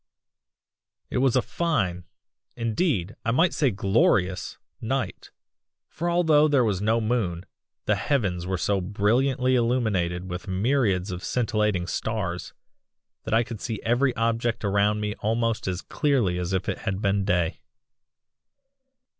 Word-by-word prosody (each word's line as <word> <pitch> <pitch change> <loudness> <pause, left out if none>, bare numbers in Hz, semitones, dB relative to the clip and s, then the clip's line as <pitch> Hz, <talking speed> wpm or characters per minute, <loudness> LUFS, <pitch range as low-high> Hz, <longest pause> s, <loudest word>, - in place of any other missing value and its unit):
"It - - 0
was 130 -1 +3
a 130 - +3
fine 90 - -1 0.5
indeed, 115 - -1
I - - -1
might 160 +9 +3
say 145 -3 +2
glorious 95 -2 +1 0.2
night, - - -3 0.6
for 170 +2 -3
although 160 -3 +4
there 140 -4 +3
was 100 -4 0
no 110 +2 +2
moon, 105 -6 -1 0.4
the - - +3
heavens 95 -11 -1
were 95 0 -1
so 100 +2 0
brilliantly 125 +7 +1
illuminated 110 -8 0
with 90 +3 -6
myriads 100 -1 +1
of 90 0 -6
scintillating 105 -6 0
stars, 90 -4 -3 0.7
that - - -2
I 115 - +4
could 115 -2 -8
see 110 -3 -3
every 120 +3 +2
object 115 0 0
around 100 +1 +2
me 105 0 -2
almost 115 0 0
as 95 0 -2
clearly 120 -12 +1
as 90 +1 -3
if 95 -1 -1
it - - -2
had 95 0 -3
been 100 -1 +1
day. 90 -3 0
110 Hz, 140 wpm, -25 LUFS, 95-125 Hz, 0.7 s, although